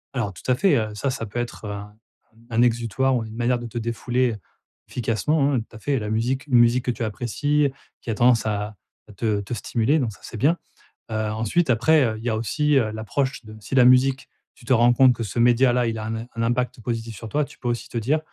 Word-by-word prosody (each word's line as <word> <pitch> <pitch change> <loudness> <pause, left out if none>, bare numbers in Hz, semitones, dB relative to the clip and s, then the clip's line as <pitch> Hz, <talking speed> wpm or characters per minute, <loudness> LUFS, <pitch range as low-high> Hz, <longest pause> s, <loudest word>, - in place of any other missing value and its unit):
Alors 115 -5 -1
tout 95 - -9
à - - +4
fait, 190 +8 +3
heu, 110 -2 -2
ça 135 +6 -2
ça 125 -3 -3
peut 110 +3 -5
être, 120 -2 -5
heu, 105 - -4
un 105 0 -8 0.5
un 115 0 +1
exutoire 120 +2 +1
ou 120 - -1
une 110 0 -9
manière 120 +1 +1
de 120 - -7
te 115 - -7
défouler, 120 +2 0
heu, 105 - -7 0.5
efficacement 135 +6 0
hein, 125 - +2
tout 110 - -14
à - - -10
fait. 140 +3 0
La 105 0 -4
musique 125 +5 -1
une 125 -3 +4
musique 120 +1 +3
que 125 - +1
tu 115 0 -4
apprécies, 140 +6 0 0.3
qui - - -8
a - - -2
tendance 120 0 +4
à 105 0 -2 0.3
à - - -12
te 105 0 -1
te 100 - -6
stimuler 120 +7 +1
donc 120 -5 -1
ça 95 - -17
c'est 115 - -8
bien. 150 +9 +2 0.5
Heu, - - -2 0.2
ensuite 115 +10 0
après, 145 +6 +4
heu, 110 -2 -2
il 110 - -10
y 120 - -1
a 110 - 0
aussi, 150 +7 0
heu, 110 -5 +1
l'approche 120 +3 -3
de, 110 0 -11
si 105 +6 -5
la 125 -2 +6
musique, 130 +1 +4 0.3
tu - - -18
te 130 - +2
rends 120 +1 +5
compte 130 +1 +6
que 120 - -7
ce 105 +3 -6
média 120 +1 +4
là 125 -1 +2
il 115 -1 -2
a 110 - -5
un 110 +1 -3
im 115 +1 -5
un 115 - -2
impact 120 +1 -1
positif 115 -1 -4
sur 110 +3 -8
toi. 150 +5 0
Tu 145 - -17
peux 125 - -5
aussi 120 0 -3
te 120 - -5
dire: 140 +8 +1
120 Hz, 260 wpm, -23 LUFS, 110-130 Hz, 0.5 s, la